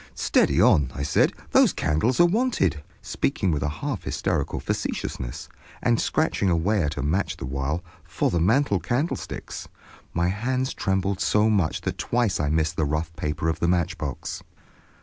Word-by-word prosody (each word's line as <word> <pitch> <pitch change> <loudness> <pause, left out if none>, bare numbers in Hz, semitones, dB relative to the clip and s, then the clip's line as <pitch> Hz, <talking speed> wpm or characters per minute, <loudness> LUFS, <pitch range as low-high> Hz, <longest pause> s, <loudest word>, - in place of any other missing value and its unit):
"Steady - - +2
on!" 70 -4 +5
I 70 - -3
said, 70 - +3 0.2
"those - - +5
candles 80 - +1
are 175 - +8
wanted," 175 - +1 0.2
speaking 95 - 0
with 75 -3 -1
a 75 - 0
half 110 - -4
hysterical - - -2
facetiousness, - - -4 0.3
and 120 -2 +2
scratching 155 -11 +1
away 90 +5 +2
at 75 -1 -2
a - - -2
match 85 +8 0
the - - -5
while, 70 +6 -2 0.2
"for 85 +1 -1
the 85 - +1
mantel 105 - +3
candlesticks." 135 - -3 0.4
My 85 +1 +1
hands 130 +6 -1
trembled 95 -1 -1
so 105 +1 +3
much 95 -7 +1
that - - -4
twice 120 -5 0
I 75 -1 0
missed 80 0 0
the 80 - +2
rough 75 +3 -2
paper 75 0 -2
of 80 0 0
the 85 - +1
matchbox. 85 -2 -2
90 Hz, 165 wpm, -25 LUFS, 75-110 Hz, 0.4 s, are